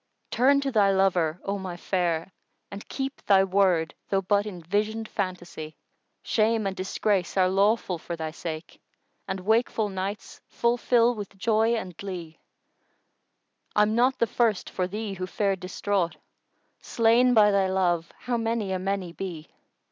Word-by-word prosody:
Turn 275 +3 +4
to 275 -1 -1
thy 205 -4 +4
lover, 180 -4 +2
O 200 0 -2
my 185 -2 -6
fair, 175 -1 -1 0.4
and 200 +1 -9
keep 270 0 -4
* - - -40
Thy 195 -1 +6
word, 185 -4 +2 0.2
though 195 -1 +1
but 205 +2 +1
in 185 -4 -7
visioned 215 +5 -1
phantasy: 175 -5 -5 0.5
Shame 220 -1 +1
and 195 -1 -2
disgrace 190 0 -1
are 185 -1 +5
lawful 195 -1 +1
for 170 - -5
thy 160 -1 -4
sake 160 0 -7 0.2
* - - -46
And 190 - -3
wakeful 220 +1 +1
nights 195 +2 -5
full 235 +1 +1
fill 240 0 +3
with 205 -3 -8
joy 225 +2 +2
and 185 -6 -5
glee: 175 -5 -7 1.4
I'm 210 +1 +4
not 250 +3 +3
the - - +3
first 225 -3 0
for 180 -1 -1
thee 210 +1 -4
who 185 -1 -5
fared 195 0 0
distraught; 185 -1 -1 0.4
* - - -45
Slain 240 +2 +3
by 210 -1 +6
thy 195 -1 +2
love 175 -3 0
how 245 -1 -1
many 225 -3 -1
a 185 - -1
many 190 -2 -2
be! 170 -5 -6
195 Hz, 165 wpm, -26 LUFS, 180-220 Hz, 1.4 s, Thy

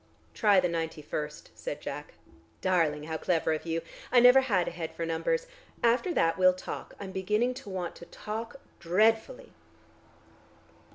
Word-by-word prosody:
"Try 205 -3 +4
the 180 - +2
ninety 165 -2 -3
first," 150 0 -5
said - - -6
Jack. - - -7 0.4
"Darling, 160 -5 +1
how 160 +1 -3
clever 165 -1 +1
of 155 +2 -4
you. 165 0 -1 0.3
I 250 - +7
never 250 +2 +8
had 200 -9 +1
a - - -2
head 165 -1 -6
for 165 - -3
numbers. 480 - 0 0.4
After 240 +10 +3
that 165 +2 +2
we'll 185 0 +6
talk; 185 - -7
I'm 195 -1 -6
beginning 210 +6 0
to - - -11
want 180 -3 -4
to 170 - -11
talk 225 +6 -6 0.2
dreadfully." 225 - +1
185 Hz, 160 wpm, -29 LUFS, 165-225 Hz, 0.4 s, never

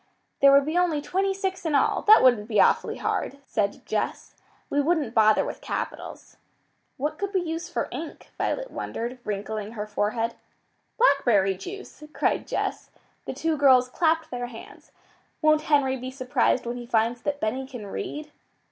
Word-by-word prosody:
"There 275 0 +7
would 275 0 +6
be 320 +4 +1
only 340 -4 +1
twenty 380 +6 0
six 385 -1 -3
in 320 -3 0
all. 280 - +2
It 430 +1 +8
wouldn't 240 -5 +4
be 215 -3 +1
awfully - - +3
hard," 275 - -2
said 205 -5 -2
Jess. - - -3 0.3
"We 290 - +1
wouldn't 295 -6 0
bother 215 -1 +4
with - - -6
capitals." - - -6 0.6
"What 300 +3 -3
could 400 0 -3
we 375 - +3
use 330 0 -4
for - - -2
ink?" 325 -2 -8
Violet - - -2
wondered, 240 +2 -5
wrinkling 210 +1 -4
her 210 -2 -4
forehead. 215 +2 -1 0.6
"Blackberry 240 - +4
juice!" 375 - -9
cried - - 0
Jess. - - -3 0.4
The - - -4
two 325 -1 -1
girls 260 -3 +5
clapped 320 +3 +1
their 245 -1 -3
hands. 230 -2 -13 0.5
"Won't 310 -1 +4
Henry 270 -3 +3
be 255 +1 -6
surprised 255 -1 0
when 240 +1 -3
he 240 -1 -8
finds 235 0 +1
that 290 -1 -2
Benny 260 +4 -2
can 245 -6 -8
read?" 300 - -6
265 Hz, 165 wpm, -25 LUFS, 230-315 Hz, 0.6 s, It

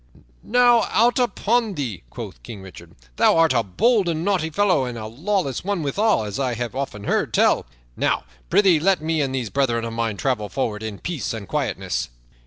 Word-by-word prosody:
"Now 240 -1 +4
out 240 +3 +3
upon 230 -2 +1
thee!" 120 - -4
quoth - - -8
King 95 - -9
Richard. 95 - -13 0.2
"Thou - - +4
art 165 -1 +4
a 115 - +3
bold 190 - +2
and 165 +1 -2
naughty 185 -5 +1
fellow 185 -3 +2
and 120 -1 -5
a 110 - -6
lawless 150 - -2
one 195 -3 -1
withal, 200 - +1
as 105 +2 -5
I 130 -3 0
have 120 +1 -4
often 135 -7 -4
heard - - 0
tell. - - +3 0.3
Now, - - 0 0.3
prythee, 190 -6 +4
let 190 +3 +3
me, 160 -1 0
and 135 -2 -1
these 120 -5 -3
brethren 120 -4 0
of 115 - -5
mine, 115 -3 -2
travel 105 -2 -1
forward 110 -5 -2
in 110 -2 -5
peace 160 - -4
and 100 -3 -7
quietness." - - -2
140 Hz, 195 wpm, -22 LUFS, -, 0.3 s, Now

